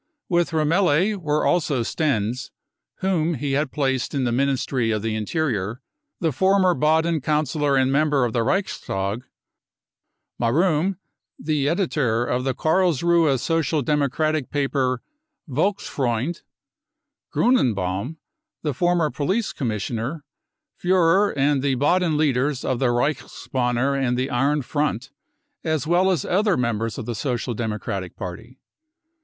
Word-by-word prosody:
With 175 -2 +2
Remmele 170 +4 +2
were 150 -4 0
also 145 -8 +1
Stenz, 125 -3 -1 0.5
whom 170 -4 +1
he 140 +1 -3
had 140 0 0
placed 135 -2 -1
in 135 - 0
the 120 - 0
Ministry 130 -2 0
of 110 -2 -1
the 115 -1 -1
Interior, 110 - -2 0.4
the 165 -4 +1
former 190 +3 +3
Baden 160 0 +2
councillor 150 0 +1
and 130 0 +3
member 145 -2 +2
of 115 - -3
the 120 - +1
Reichstag, 110 - -1 1.2
Marum, 165 +8 +2 0.4
the 145 -2 0
editor 145 - 0
of 125 +1 -1
the 130 - 0
Karlsruhe 170 -3 +2
Social 160 0 0
Democratic 150 +1 0
paper 135 -3 0 0.4
Volksfreund> 145 - -1 0.9
Grixne 235 - +3
baum, 100 - -3 0.5
the 150 -3 -1
former 175 +1 +1
police 190 +10 -1
commissioner, 120 +5 -3 0.5
Furrer, 185 +2 +3
and 140 0 +2
the 135 -1 +1
Baden 160 +4 +2
leaders 140 -2 +1
of 130 -2 0
the 130 - +2
Reichsbanner 125 0 -1
and 125 -3 0
the 130 +3 -1
Iron 140 +3 +1
Front 135 -2 -2 0.5
as 155 -2 -1
well 175 +4 +3
as 180 -4 0
other 200 +1 +2
members 115 -2 -1
of - - -5
the 120 - -3
fecial 120 +1 -2
Democratic 105 -5 -4
party. 110 +8 -8
140 Hz, 125 wpm, -23 LUFS, 125-160 Hz, 1.2 s, former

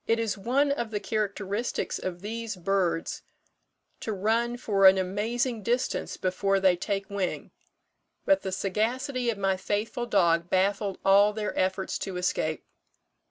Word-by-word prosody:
"It 230 - +3
is 225 -2 -1
one 260 +8 +1
of 235 -5 -2
the 210 -1 -2
characteristics 205 +1 -2
of 175 -1 -5
these 225 0 -4
birds 180 -2 -1 0.8
to 220 - -4
run 225 +4 0
for 200 -5 +4
an 190 0 +7
amazing 220 +5 -1
distance 240 +4 -1
before 195 +1 +1
they 190 -2 +4
take 195 +2 -3
wing; 195 -3 -3 0.7
but 290 0 +4
the 190 - -4
sagacity 235 +7 -1
of 225 - -1
my 195 -1 +1
faithful 220 +5 -2
dog 170 -5 +2
baffled 195 +1 +1
all 200 +2 +6
their 210 -1 -3
efforts 190 +1 -1
to 190 -2 -4
escape. 160 -3 -1
200 Hz, 145 wpm, -27 LUFS, 190-230 Hz, 0.8 s, an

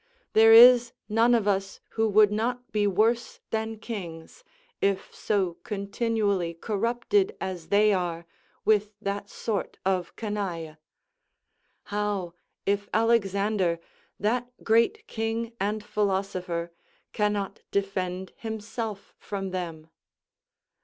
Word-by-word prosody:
There 225 +1 +7
is 240 +1 +9
none 230 +3 +4
of 215 -3 +1
us 195 -1 0
who 225 0 0
would 210 0 +6
not 245 +4 -2
be 210 -1 +2
worse 225 +4 +1
than 220 0 -2
kings, 195 - -7 0.4
if 195 -1 0
so 190 -5 -1
continually 200 -3 -1
corrupted 240 - 0
as 180 -4 -5
they 205 +3 +4
are 170 -3 -2 0.4
with 210 -1 +2
that 200 0 -3
sort 215 -4 -3
of 185 -2 0
canaille. 185 -8 -4 1.1
How, 205 -4 -2 0.3
if 200 0 0
Alexander, 200 -5 +2 0.4
that 245 +4 0
great 230 - +3
king 225 - -3
and 210 +2 -1
philosopher, 190 -5 -1 0.4
cannot 205 -2 -1
defend 190 -2 -2
himself 220 -1 -5
from 195 -2 -4
them! 165 -4 -5
205 Hz, 105 wpm, -27 LUFS, 190-225 Hz, 1.1 s, is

